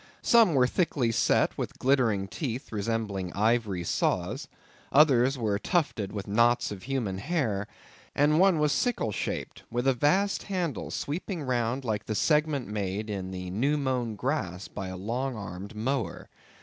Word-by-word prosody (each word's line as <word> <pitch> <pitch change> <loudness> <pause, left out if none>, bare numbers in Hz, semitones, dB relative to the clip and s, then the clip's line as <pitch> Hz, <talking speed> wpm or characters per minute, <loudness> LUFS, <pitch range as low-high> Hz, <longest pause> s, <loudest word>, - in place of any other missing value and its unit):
Some 225 -9 +5
were 125 -2 +5
thickly 130 -4 +1
set - - +2
with - - -4
glittering 120 -7 +2
teeth 130 - -4
resembling 105 -3 -2
ivory 105 -4 +1
saws; - - -1 0.4
others 135 -3 +5
were 105 -4 0
tufted 125 - 0
with 100 -1 -5
knots 120 +3 +2
of 100 -2 -6
human 115 -7 -2
hair; 110 - -1 0.5
and 150 +2 +4
one 190 -2 +5
was 150 -1 +2
sickle 235 - 0
shaped, - - -4
with 120 +2 -2
a 135 - +5
vast 185 +11 +2
handle 180 -6 -3
sweeping 170 +2 -3
round 125 0 -1
like 105 -2 -2
the 110 - -2
segment 150 -1 +2
made 105 +1 -3
in 95 -2 -4
the 90 -1 -5
new 135 +10 +1
mown 125 -5 -1
grass 100 - -2
by 95 -2 -6
a 95 0 -6
long 120 +7 -2
armed 100 0 -7
mower. 130 +4 -2
120 Hz, 155 wpm, -28 LUFS, 100-145 Hz, 0.5 s, Some